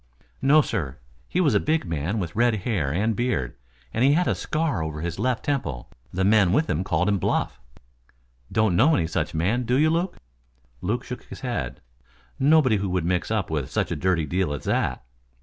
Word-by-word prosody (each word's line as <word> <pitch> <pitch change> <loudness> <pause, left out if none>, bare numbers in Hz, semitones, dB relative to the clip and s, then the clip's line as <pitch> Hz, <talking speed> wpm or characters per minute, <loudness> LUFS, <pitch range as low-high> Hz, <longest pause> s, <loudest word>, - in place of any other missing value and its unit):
"No, 150 +3 +5
sir. 80 - -3 0.3
He 180 - 0
was 150 -9 +3
a 100 - +4
big 155 +2 0
man 85 +5 -2
with 90 -5 -4
red 120 +1 +3
hair 90 - 0
and 105 +7 0
beard 110 - -1 0.4
and 115 - +1
he 140 +2 +5
had 180 +4 +2
a - - +2
scar 155 - -1
over 80 -1 -4
his 85 +1 -4
left 125 +1 0
temple. 95 - -2 0.2
The 95 +2 -1
men 100 -2 +4
with 155 +4 +2
him 80 +5 0
called 95 - 0
him 100 -2 +2
Bluff." - - -1 0.9
"Don't 110 -5 +2
know 145 - +5
any 85 - +1
such 80 - -2
man, 95 +10 +1
do 125 +1 0
you, 155 +2 +4
Luke?" 175 +3 -1 0.6
Luke 120 +7 -1
shook 125 - -7
his - - -10
head. 115 - -3 0.6
"Nobody 140 -5 +4
who 100 -1 -2
would 90 -2 -1
mix 90 0 0
up 105 -7 -1
in 75 -4 -1
such - - -1
a - - 0
dirty 90 -4 +1
deal 90 0 -1
as 70 - -5
that. 65 - -1
105 Hz, 200 wpm, -24 LUFS, 85-130 Hz, 0.9 s, No